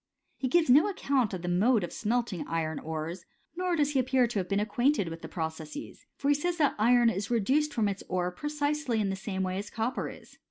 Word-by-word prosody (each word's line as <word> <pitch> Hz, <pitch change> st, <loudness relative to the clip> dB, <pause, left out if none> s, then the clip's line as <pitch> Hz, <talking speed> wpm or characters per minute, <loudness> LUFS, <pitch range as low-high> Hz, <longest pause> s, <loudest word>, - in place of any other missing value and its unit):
f -, -, -34 dB
He 260 Hz, -, +1 dB
gives 325 Hz, +5 st, +3 dB
no 290 Hz, +9 st, +6 dB
account 275 Hz, -, 0 dB
of 180 Hz, -2 st, -5 dB
the -, -, -3 dB
mode 205 Hz, +5 st, +3 dB
of 175 Hz, -, -5 dB
smelting 225 Hz, -4 st, -1 dB
iron 160 Hz, -2 st, -2 dB
ores; 160 Hz, +3 st, -5 dB, 0.3 s
nor 360 Hz, 0 st, 0 dB
does 295 Hz, -2 st, +2 dB
he 275 Hz, -, +2 dB
appear 255 Hz, 0 st, +3 dB
to 230 Hz, -3 st, -2 dB
have 180 Hz, -, -4 dB
been 200 Hz, 0 st, +1 dB
acquainted 220 Hz, -, +1 dB
with 165 Hz, 0 st, -8 dB
the -, -, -7 dB
processes; 160 Hz, -, -6 dB
for 280 Hz, -, -1 dB
he -, -, +6 dB
says 345 Hz, +4 st, -1 dB
that 295 Hz, -4 st, +3 dB
iron 240 Hz, +1 st, +5 dB
is 200 Hz, 0 st, -3 dB
reduced 265 Hz, +7 st, +2 dB
from 220 Hz, -3 st, +1 dB
its 200 Hz, -1 st, -3 dB
ore 180 Hz, -1 st, 0 dB
precisely 295 Hz, 0 st, -1 dB
in 200 Hz, -2 st, 0 dB
the -, -, -2 dB
same 190 Hz, 0 st, -3 dB
way 185 Hz, +1 st, -2 dB
as 205 Hz, +1 st, -6 dB
copper 230 Hz, +3 st, -2 dB
is. -, -, -14 dB
225 Hz, 235 wpm, -29 LUFS, 185-280 Hz, 0.3 s, no